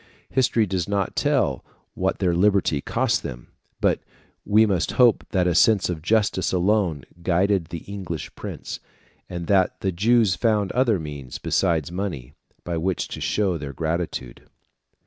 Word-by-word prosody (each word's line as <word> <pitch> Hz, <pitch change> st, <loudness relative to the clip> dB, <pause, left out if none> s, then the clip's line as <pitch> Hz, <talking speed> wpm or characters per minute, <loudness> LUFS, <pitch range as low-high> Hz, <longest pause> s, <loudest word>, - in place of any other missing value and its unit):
History 120 Hz, -4 st, +2 dB
does 95 Hz, -2 st, -2 dB
not 100 Hz, -2 st, -1 dB
tell -, -, +1 dB, 0.3 s
what -, -, -1 dB
their 90 Hz, -3 st, +1 dB
liberty 95 Hz, -5 st, +2 dB
cost -, -, 0 dB
them; -, -, -8 dB, 0.3 s
but -, -, +2 dB, 0.4 s
we 110 Hz, +2 st, +4 dB
must 95 Hz, -5 st, 0 dB
hope 120 Hz, -3 st, +4 dB
that 90 Hz, -2 st, +1 dB
a 90 Hz, -, +2 dB
sense 100 Hz, +3 st, +4 dB
of 80 Hz, -3 st, -5 dB
justice 105 Hz, 0 st, +1 dB
alone 90 Hz, -5 st, +1 dB, 0.2 s
guided 95 Hz, +1 st, +2 dB
the 85 Hz, 0 st, -7 dB
English 95 Hz, -5 st, -6 dB
prince, -, -, -7 dB, 0.5 s
and 85 Hz, -1 st, -5 dB
that 95 Hz, 0 st, +2 dB
the 95 Hz, -, 0 dB
Jews 110 Hz, +2 st, +3 dB
found 105 Hz, -4 st, +1 dB
other 125 Hz, -4 st, +2 dB
means 75 Hz, -6 st, -7 dB
besides 85 Hz, -5 st, 0 dB
money 85 Hz, -9 st, -4 dB, 0.3 s
by 85 Hz, -1 st, -3 dB
which 90 Hz, +2 st, -1 dB
to -, -, -7 dB
show 95 Hz, -5 st, 0 dB
their 70 Hz, -1 st, -6 dB
gratitude. 80 Hz, -5 st, -4 dB
95 Hz, 150 wpm, -23 LUFS, 85-100 Hz, 0.5 s, we